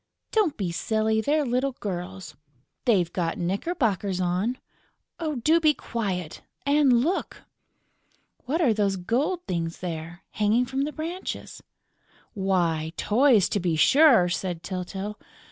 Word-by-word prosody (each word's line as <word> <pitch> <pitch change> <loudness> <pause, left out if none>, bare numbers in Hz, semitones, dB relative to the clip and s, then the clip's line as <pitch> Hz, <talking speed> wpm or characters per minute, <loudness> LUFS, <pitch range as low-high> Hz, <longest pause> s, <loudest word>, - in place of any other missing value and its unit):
"Don't 420 -9 +2
be 190 -5 -2
silly!... 220 +4 0
They're 295 +4 +1
little 255 +2 0
girls...." 185 -6 -6 0.5
"They've 185 -9 +2
got 170 -3 -1
knickerbockers 200 - -1
on...." 185 +7 0 0.9
"Do 325 +2 +5
be 310 -2 +3
quiet!... 185 -8 -4 0.2
And 280 -4 +4
look!..." 355 +6 -2 1.0
"What 305 +7 0
are 255 -9 +4
those 200 -2 +1
gold 265 - -1
things 170 -2 -2
there, 170 0 -6
hanging 220 +4 +2
from 270 +2 -1
the 300 - -4
branches?" 335 +5 -6 0.7
"Why, 170 -6 0
toys, 230 -3 +4
to 205 - 0
be 175 -3 0
sure!" 255 - +6
said 175 -1 -3
Tyltyl. 190 +3 -5
210 Hz, 125 wpm, -26 LUFS, 180-270 Hz, 1.0 s, sure